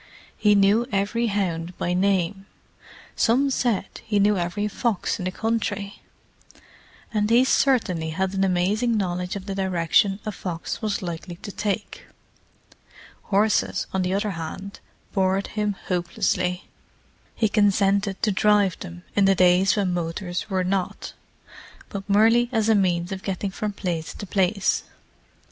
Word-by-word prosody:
He 210 -1 +3
knew 205 +4 +4
every 210 +4 0
hound 180 -4 -2
by 175 - -1
name; 195 0 0 0.7
some 265 +5 +2
said 235 -7 +1 0.2
he 220 -2 -1
knew 205 +1 +4
every 180 +3 -1
fox 210 -2 -1
in 180 - -4
the 185 - -1
country; 205 -1 -2 1.1
and 210 -1 +1
he 240 +3 +5
certainly 210 -13 +2
had 190 +4 -1
an 195 0 +1
amazing 200 +6 +1
knowledge 180 -2 -2
of 195 -1 -6
the 200 - -4
direction 190 +1 +2
a 215 - -2
fox 175 -3 -5
was 210 -3 -2
likely 175 0 -5
to 205 - -6
take. 205 0 -4 1.2
Horses, 210 +1 +1
on 190 - +1
the 185 +1 0
other 205 +1 -1
hand, 175 +4 -7 0.3
bored 190 0 +1
him 210 -1 0
hopelessly; 180 +1 -1 0.7
he 220 - +2
consented 200 -1 +2
to 215 - +3
drive 205 -1 +3
them, 175 -1 -9
in 200 - +4
the 195 0 +4
days 180 +1 +4
when 195 -4 0
motors 175 +2 -3
were 190 -2 0
not, 185 0 -2 0.8
but 200 0 -7
merely 225 +4 +4
as 225 -2 +1
a - - +6
means 180 -3 +1
of 190 0 -4
getting 195 0 -3
from 210 +2 -3
place 175 -5 -4
to 205 - -7
place. 195 +1 +1
195 Hz, 145 wpm, -24 LUFS, 180-210 Hz, 1.2 s, a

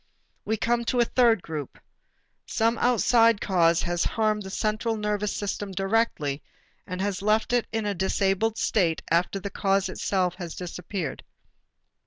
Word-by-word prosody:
We 220 - 0
come 235 +2 +1
to 245 +1 0
a 240 - +5
third 230 -5 +3
group. 150 -4 -6 0.7
Some 225 +1 +1
outside 230 -2 +4
cause 170 -4 +2
has 175 0 0
harmed 215 -1 0
the 190 - -7
central 215 +3 -1
nervous 210 -1 -1
system 205 0 -3
directly, 195 -8 0 0.5
and 180 -1 -5
has 200 -1 -2
left 215 +3 +1
it 245 -1 +2
in 225 -1 -2
a 205 - 0
disabled 195 +3 0
state 170 -6 +1
after 175 +4 +1
the 200 +1 -6
cause 195 -1 +1
itself 185 -1 0
has 175 -3 -6
disappeared. 180 -3 -5
200 Hz, 150 wpm, -26 LUFS, 180-225 Hz, 0.7 s, a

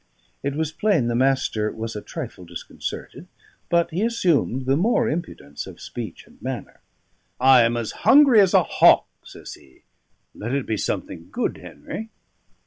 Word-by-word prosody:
It 140 0 -2
was 160 0 -1
plain 160 - +1
the 120 - -1
Master 125 -4 +1
was 115 0 -6
a 105 - -4
trifle 90 - -7
disconcerted; 85 -1 -8 0.4
but 170 0 +2
he 175 +5 -2
assumed 170 - +1
the 135 +1 +2
more 205 +11 +2
impudence 150 - -5
of - - -11
speech - - -8
and - - -22
manner. - - -6 0.6
"I 130 -1 +7
am 115 +1 +2
as 115 -2 -3
hungry 275 -6 +7
as 190 -2 +3
a - - +6
hawk," - - +5 0.2
says - - -11
he. 65 - -19 0.5
"Let 115 +5 -4
it 140 - -1
be 110 - -1
something 85 -3 -4
good, - - -2
Henry." 220 +1 -8
135 Hz, 160 wpm, -23 LUFS, 115-175 Hz, 0.6 s, I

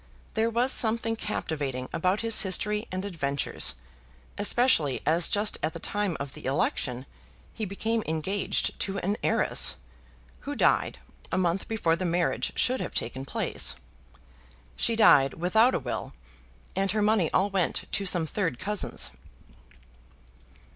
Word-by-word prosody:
There 225 +1 +1
was 240 +3 +2
something 225 0 +2
captivating 145 - -3
about 185 +4 0
his 230 -1 +3
history 210 +2 +1
and 185 +1 -3
adventures, 140 - -1 0.6
especially 205 - +3
as 165 +2 +3
just 205 +1 +1
at 160 - -1
the 165 - -7
time 205 -1 -2
of 140 -1 -6
the - - -10
election 130 -1 -1 0.5
he 220 - -4
became 220 +4 -2
engaged 160 +6 -1
to 195 0 -2
an 200 +2 -1
heiress, - - +3 0.6
who - - -6
died - - +2 0.3
a - - 0
month 180 0 0
before 190 -7 +1
the 185 - -5
marriage 175 0 0
should 255 +1 +1
have - - -5
taken 130 +1 -3
place. - - 0 1.0
She 230 - +2
died 140 -11 +5
without 220 +9 +3
a - - 0
will, 125 -3 -5 0.6
and 195 +1 0
her 215 - 0
money 210 -6 +2
all 200 +2 +1
went 190 -3 0
to 200 - 0
some 175 -3 +4
third 165 - -2
cousins. 210 +6 -3
190 Hz, 140 wpm, -27 LUFS, 160-215 Hz, 1.0 s, died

